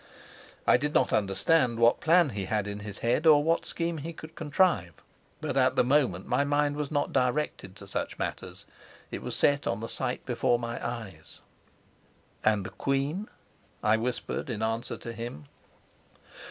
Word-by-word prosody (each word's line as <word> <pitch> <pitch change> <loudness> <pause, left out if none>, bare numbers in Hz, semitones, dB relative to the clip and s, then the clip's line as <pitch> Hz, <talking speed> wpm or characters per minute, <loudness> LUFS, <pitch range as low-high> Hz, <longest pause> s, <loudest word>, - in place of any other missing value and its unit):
I - - +6
did 150 +1 -2
not - - +3
understand 115 +6 +2
what 115 +1 +4
plan 170 -1 +4
he 100 -2 -4
had 105 +1 -1
in 105 0 -5
his 100 0 -7
head, 125 +7 +2
or 150 -2 +7
what 165 +2 +1
scheme 165 -1 -1
he 165 +4 -6
could 160 0 -11
contrive. 150 - +1 0.5
But - - -3
at - - +3
the - - +4
moment 125 -9 +2
my 125 +3 +1
mind 145 0 +1
was 150 -1 -3
not 145 -2 -1
directed 130 +3 -1
to - - -11
such - - -4
matters; - - -5 0.5
it - - -5
was - - -4
set 145 0 +2
on 100 - -1
the 115 - -5
sight 125 +1 -3
before 120 -1 +1
my 120 0 -5
eyes. 110 -10 -7 1.0
"And 105 -3 +2
the - - -6
queen?" 140 +9 -1 0.6
I 105 +1 +4
whispered 125 +3 -3
in 110 -2 -3
answer 115 +1 -2
to 115 - -7
him. 115 -10 -7
125 Hz, 170 wpm, -28 LUFS, 110-150 Hz, 1.0 s, or